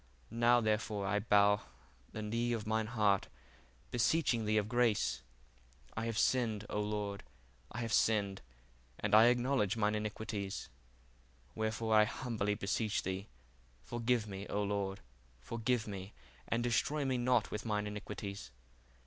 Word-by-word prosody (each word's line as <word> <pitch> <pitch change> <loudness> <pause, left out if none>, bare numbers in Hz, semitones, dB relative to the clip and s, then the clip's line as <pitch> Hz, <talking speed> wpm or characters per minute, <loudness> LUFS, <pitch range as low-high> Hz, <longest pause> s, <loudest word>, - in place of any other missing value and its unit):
Now 120 +1 +4
therefore 110 -2 0
I 105 +2 +1
bow 105 -1 +4 0.5
the 110 - -5
knee 115 +3 0
of 110 -3 -3
mine 110 0 0
heart, 105 -4 +2 0.6
beseeching 120 -2 +2
thee 110 +1 +2
of 105 -1 +1
grace. 110 - +1 0.7
I 110 - -2
have 115 -2 -2
sinned, 110 -5 +1
O 105 - 0
Lord, 105 -1 -3 0.5
I 120 - -4
have 115 -2 -2
sinned, 100 -3 +2 0.6
and - - -2
I 110 +1 +9
acknowledge 120 -3 +2
mine 105 -1 +2
iniquities: 105 -2 -4 0.8
wherefore, 110 0 -1
I 105 0 +7
humbly 105 -3 -2
beseech 105 +1 -1
thee, 95 +2 -3 0.6
forgive 120 -1 0
me, 100 -1 -6
O 105 - -1
Lord, 100 -1 -2 0.4
forgive 115 - -1
me, 100 -1 -7 0.3
and 115 +1 0
destroy 140 +5 +1
me 130 -2 0
not 125 0 +2
with 105 - -3
mine 105 -2 -1
iniquites. 100 - -6
110 Hz, 140 wpm, -34 LUFS, 105-115 Hz, 0.8 s, I